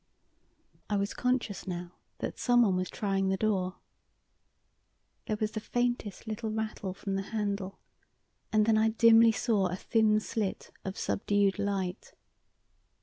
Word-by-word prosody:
I 205 - +1
was 200 +1 -1
conscious 250 -6 -1
now 175 -1 -4 0.3
that - - -5
someone 240 -6 +4
was 185 0 -1
trying 195 -2 0
the 190 - +1
door. 190 -3 0 1.5
There 215 -2 -1
was 215 0 0
the 215 - -3
faintest 240 -3 -2
little 220 0 -3
rattle 215 -3 -3
from 195 0 -4
the 195 - 0
handle, 200 -3 -2 0.7
and 215 -1 +4
then 220 -1 +4
I 220 0 +4
dimly 230 0 +6
saw 215 -4 +1
a 180 - -3
thin 215 +2 +2
slit 210 -2 -3
of 190 0 -5
subdued 200 -1 +1
light. 195 -3 -2
210 Hz, 140 wpm, -30 LUFS, 195-220 Hz, 1.5 s, dimly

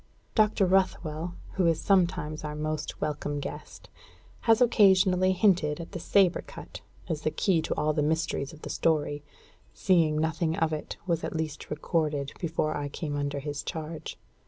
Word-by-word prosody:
Dr. 215 -2 +3
Ruthwell, 175 -3 0 0.2
who 180 -3 +3
is 165 -2 +2
sometimes 170 -5 +1
our 150 0 -4
most 155 0 -3
welcome 145 -1 -2
guest, - - -8 0.6
has 225 - +6
occasionally 190 -5 +5
hinted 180 -6 +2
at 165 - -7
the 180 - -5
sabre 185 +1 +3
cut - - -10 0.3
as 160 -3 -2
the 155 - +1
key 170 +1 +1
to - - -2
all 150 0 +1
the 150 - 0
mysteries 155 -2 -1
of 155 - -15
the - - -5
story, 150 -2 0 0.5
seeing 165 -5 +3
nothing 160 +1 0
of 160 -1 +1
it 155 - -5
was 170 -3 0
at - - -4
least 155 -2 -4
recorded 150 -2 -1
before 155 -2 -1
I 145 -1 -2
came 145 0 -4
under 145 0 -2
his 145 0 -4
charge. 160 0 -6
160 Hz, 165 wpm, -28 LUFS, 150-180 Hz, 0.6 s, has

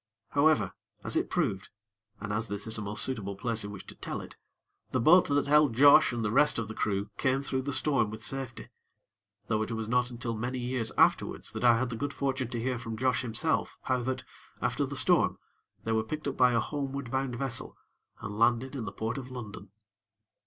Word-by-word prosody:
However, 150 +2 +3 0.3
as - - -1
it - - 0
proved, 95 +1 -1 0.5
and 105 0 -4
as 110 +2 0
this 100 -1 -3
is 110 0 +1
a 105 - 0
most 105 0 -1
suitable 105 -7 -3
place 115 +1 -1
in 100 - -5
which 100 -2 -9
to - - -11
tell - - -5
it, - - -10 0.5
the 130 - 0
boat 175 +9 +6
that 145 -1 +1
held 145 -4 +4
Josh 145 +3 +7
and 120 -2 -2
the 105 - 0
rest 150 +6 +4
of 115 -2 -2
the 110 - -6
crew 100 -1 -2
came 135 +1 +1
through 130 -1 -1
the 140 +2 -3
storm 135 -5 +3
with 110 +1 -7
safety; 135 -1 -4 0.8
though 110 -1 0
it 110 - -2
was 110 -1 -3
not 125 +1 +1
until 120 -1 -4
many 120 +4 -3
years 125 -2 -1
afterwards - - +2
that - - -5
I 120 -2 +6
had 125 +1 -1
the - - -3
good 140 +5 -4
fortune 135 -2 -1
to 120 0 -4
hear 125 +1 -1
from 115 -2 -6
Josh 130 +1 +1
himself 130 +7 -1
how 130 -1 0
that, 130 +1 -3 0.4
after - - 0
the - - -6
storm, - - +3 0.5
they 115 - -2
were 110 0 +2
picked 150 +7 -5
up 140 - -2
by 125 -1 +4
a 115 - +3
homeward 140 -3 -4
bound 130 -2 -1
vessel, 125 -1 -4 0.4
and 105 +1 -6
landed 120 +4 +2
in 120 -5 -4
the 100 - -5
Port 115 +6 -3
of 130 -1 -9
London. 105 -6 -8
120 Hz, 215 wpm, -29 LUFS, 110-135 Hz, 0.8 s, Josh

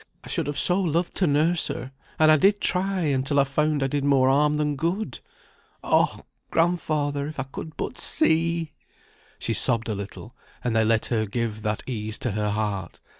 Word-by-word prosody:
I - - -11
should - - -2
have 145 -1 -3
so 180 +2 +4
loved 170 0 0
to 185 - +2
nurse 155 +4 +2
her; 130 - -5 0.3
and 155 0 +6
I - - +7
did 200 +6 +3
try, 190 0 0
until 140 -2 +1
I - - +6
found 145 +1 0
I - - +1
did 140 +1 -2
more 135 -2 +4
harm 150 +2 +3
than 150 -1 0
good. 175 +9 -2 0.6
Oh! - - +1 0.2
grandfather; 155 -4 0
if 155 -2 -7
I - - 0
could 150 +4 -9
but - - -4
see!" 165 0 +2 0.7
She - - -2
sobbed 115 -1 +1
a - - 0
little; 100 0 -8 0.3
and 120 -2 -1
they 110 - +4
let 110 0 +2
her 110 -2 0
give 110 0 -3
that 105 -1 -2
ease 110 -3 -3
to 120 - -2
her 105 +1 -1
heart. 100 -4 -3
145 Hz, 190 wpm, -25 LUFS, 115-160 Hz, 0.7 s, I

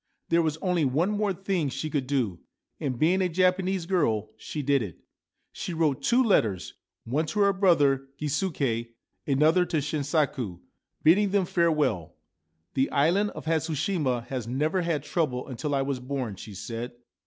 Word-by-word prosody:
There 170 0 +4
was 155 -2 0
only 180 -4 +2
one 150 +9 +1
more 210 -1 0
thing 185 -5 -1
she 135 +4 -3
could 145 -4 -2
do, 120 -11 0 0.4
and, 130 -4 -2
being 175 +8 +3
a 185 - +1
Japanese 185 +1 +1
girl, 115 - 0
she 150 - -5
did 140 0 +3
it. 100 -7 -6 0.5
She 175 - -5
wrote 155 -4 +1
two 245 +2 +3
letters, 110 - +1 0.3
one 150 +7 -1
to 205 +7 -1
her 200 0 +4
brother 145 -8 +3
Gisuke, 140 -7 -1 0.3
another 155 +6 +4
to 160 - 0
Shinsaku, 145 - -1 0.4
bidding 195 +6 +5
'them 195 -1 +2
farewell. 155 - +1 0.3
' 80 +2 -49
The 135 0 +1
island 175 +9 +2
of - - -8
Hatsushima 155 -5 0
has 125 -4 -4
never 150 +9 0
had 165 -5 -1
trouble 150 -6 -1
until 140 +3 -2
I 135 - +1
was 135 -2 -2
born/ 125 -4 -3
she 105 +1 -10
said. 115 +5 -5
150 Hz, 165 wpm, -27 LUFS, 130-175 Hz, 0.5 s, bidding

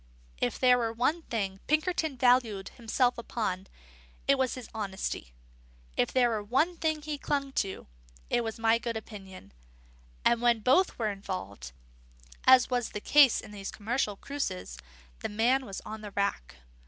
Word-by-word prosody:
If 125 - 0
there 250 -1 +5
were 230 -1 0
one 255 +9 0
thing 195 -9 -3
Pinkerton 310 -2 +1
valued 245 -6 +3
himself 245 +1 0
upon, 195 -5 -3 0.6
it 275 - +6
was 260 -2 0
his 255 -3 -8
honesty; 195 - -4 0.6
if 120 - +1
there 250 -2 +4
were 220 -2 -1
one 270 +12 +1
thing 315 -2 -1
he 295 -1 -4
clung 280 -2 -1
to, 195 -2 -6 0.4
it 240 - +1
was 225 -1 -4
my 225 0 +3
good 235 -1 -3
opinion; 195 - -10 0.7
and 235 0 +4
when 240 -2 +3
both 270 - +3
were 220 -3 0
involved, 185 - -6 0.7
as 255 -1 +7
was 245 -2 0
the 210 - -3
case 280 +2 +5
in 215 - -12
these 200 -2 -6
commercial 215 0 -1
cruces, 270 -6 -4 0.4
the - - -3
man 245 +5 +2
was 195 - -6
on 215 0 -8
the 210 - -7
rack. 200 - -2
230 Hz, 160 wpm, -29 LUFS, 205-260 Hz, 0.7 s, as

